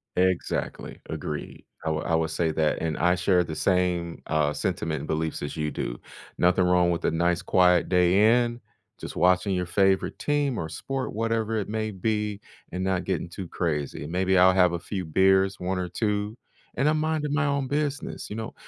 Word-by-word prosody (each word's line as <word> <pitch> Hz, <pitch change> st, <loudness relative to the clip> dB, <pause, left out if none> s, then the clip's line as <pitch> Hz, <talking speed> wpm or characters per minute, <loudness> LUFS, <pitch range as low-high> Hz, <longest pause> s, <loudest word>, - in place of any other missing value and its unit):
Exactly. 95 Hz, -1 st, -1 dB
Agreed. -, -, -5 dB, 0.2 s
I -, -, -2 dB
wi 80 Hz, 0 st, -1 dB
I 85 Hz, -, +1 dB
will 80 Hz, 0 st, +1 dB
say 80 Hz, +1 st, -1 dB
that, 80 Hz, 0 st, 0 dB
and 80 Hz, -1 st, -2 dB
I 90 Hz, +2 st, +3 dB
share 90 Hz, 0 st, +2 dB
the 80 Hz, -2 st, -6 dB
same, 90 Hz, -2 st, 0 dB
uh, 75 Hz, -1 st, +1 dB
sentiment 80 Hz, 0 st, -2 dB
and 75 Hz, -, -7 dB
beliefs 80 Hz, 0 st, -2 dB
as 75 Hz, -, -4 dB
you 75 Hz, -2 st, -2 dB
do. -, -, -4 dB, 0.4 s
Nothing 90 Hz, +1 st, +3 dB
wrong 90 Hz, -1 st, +3 dB
with 85 Hz, -, -2 dB
a -, -, +2 dB
nice 85 Hz, +1 st, +1 dB
quiet 90 Hz, -1 st, +3 dB
day 100 Hz, +7 st, +4 dB
in, 120 Hz, 0 st, -4 dB, 0.4 s
just -, -, -7 dB
watching 90 Hz, +2 st, +3 dB
your 90 Hz, 0 st, -1 dB
favorite 95 Hz, +2 st, +1 dB
team 145 Hz, -4 st, 0 dB
or 80 Hz, -, -3 dB
sport, 130 Hz, +12 st, -4 dB
whatever 115 Hz, 0 st, -1 dB
it 105 Hz, -3 st, -2 dB
may 110 Hz, 0 st, -2 dB
be, 105 Hz, +1 st, -2 dB, 0.3 s
and 90 Hz, +2 st, -3 dB
not 95 Hz, -1 st, 0 dB
getting 90 Hz, -2 st, -2 dB
too 90 Hz, +1 st, -7 dB
crazy. 75 Hz, -5 st, -3 dB
Maybe 95 Hz, +3 st, +1 dB
I'll 95 Hz, +1 st, +6 dB
have 90 Hz, -2 st, +4 dB
a 85 Hz, -, -2 dB
few 95 Hz, +1 st, -5 dB
beers, 95 Hz, +3 st, +3 dB
1 90 Hz, +1 st, -2 dB
or 90 Hz, -, -2 dB
2, 105 Hz, +3 st, -2 dB, 0.4 s
and 135 Hz, -, +1 dB
I'm 155 Hz, 0 st, +2 dB
minding 155 Hz, -2 st, -1 dB
my 155 Hz, +1 st, +2 dB
own 140 Hz, -2 st, 0 dB
business, 145 Hz, +1 st, -3 dB
you 105 Hz, -, -5 dB
know? 110 Hz, +1 st, -5 dB
90 Hz, 195 wpm, -26 LUFS, 85-110 Hz, 0.4 s, I'll